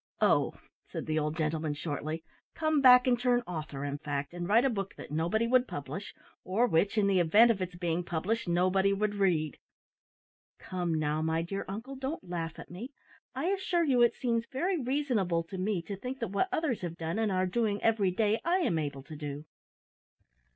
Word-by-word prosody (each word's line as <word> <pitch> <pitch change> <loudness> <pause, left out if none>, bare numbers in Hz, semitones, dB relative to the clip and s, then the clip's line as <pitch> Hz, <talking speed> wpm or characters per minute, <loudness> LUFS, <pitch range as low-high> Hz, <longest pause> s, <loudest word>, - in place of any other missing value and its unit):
"Oh," - - +3 0.4
said - - -4
the 155 0 0
old 150 +1 -2
gentleman, 155 -1 -1
shortly; 155 +1 -4 0.3
"come 310 -2 +1
back 250 -1 +8
and 245 -2 +3
turn 245 -1 +2
author, 155 -5 -5
in 145 0 -3
fact, 145 0 -3
and 175 0 -4
write 225 +6 +4
a - - +4
book 195 -3 -4
that - - -10
nobody 170 +9 +1
would 250 +1 +3
publish, 145 +8 -6 0.3
or 205 +6 +2
which, 200 +1 +1
in 210 - +4
the 195 -2 +3
event 210 +8 +6
of 200 -4 -2
its 180 -1 -4
being 175 0 -1
published, 185 +7 -2
nobody 185 +3 +3
would 205 +1 0
read!" 175 -7 +1 1.0
"Come, 175 -3 -2
now, 155 0 0
my 160 +1 0
dear 195 +4 -4
uncle, 225 +8 -6
don't 265 - -5
laugh 165 -2 -4
at - - -10
me. 210 +9 -7 0.5
I 295 +7 -1
assure 375 -3 +1
you 260 -6 +3
it 240 - +4
seems 235 -2 -1
very 345 +5 0
reasonable 240 -11 0
to 185 +3 -7
me 190 -2 -1
to 200 +4 -5
think 250 +7 -5
that 230 -7 -4
what 200 - +1
others 315 - 0
have 170 -2 -5
done, 165 +5 -3
and 220 -2 +1
are 185 0 +1
doing 210 +1 0
every 220 -4 +3
day, 215 +4 +1
I 345 +2 +2
am 170 - +1
able 140 -3 -4
to 155 +3 -10
do." 145 0 -6
195 Hz, 200 wpm, -30 LUFS, 165-240 Hz, 1.0 s, back